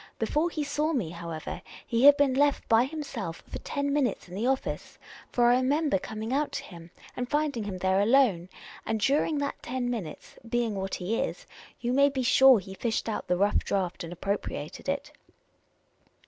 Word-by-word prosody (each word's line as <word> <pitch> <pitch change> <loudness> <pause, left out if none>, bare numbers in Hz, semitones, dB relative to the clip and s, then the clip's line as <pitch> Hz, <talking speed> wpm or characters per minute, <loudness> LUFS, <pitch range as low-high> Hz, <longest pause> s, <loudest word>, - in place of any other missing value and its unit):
Before 300 +9 +1
he 310 -3 -3
saw 300 +3 -1
me, 205 - -1
how 170 0 -7
ever, 160 -1 -5 0.2
he 235 +3 +2
had 285 0 +9
been 280 -2 +3
left 285 +1 +2
by 225 +2 +5
himself 275 - -6
for - - -6
ten 280 -1 -2
minutes 270 -10 0
in 175 - -12
the 215 +6 -1
office; 265 0 -2 0.3
for 240 - +3
I 245 - +5
remember 275 - +1
coming 220 +5 -5
out 290 +2 0
to - - -3
him 170 -3 -12 0.3
and 250 0 -3
finding 290 -7 0
him 195 -2 -4
there 190 +1 +2
alone; 205 -6 +3 0.3
and 220 - -1
during 290 +6 +2
that 285 0 -3
ten 245 0 -2
minutes, 205 -10 -7
being 235 -2 0
what 195 -1 -3
he 200 +5 -2
is, - - -3 0.4
you 240 +1 0
may 280 +2 +5
be 265 -2 -2
sure 265 +1 +7
he 190 -1 -7
fished 225 +4 -2
out 220 - -3
the 180 - +1
rough 200 +2 +3
draft 185 -4 -2
and 165 - -7
appropri 195 +4 -3
ated - - -7
it - - -2
240 Hz, 195 wpm, -28 LUFS, 195-280 Hz, 0.4 s, had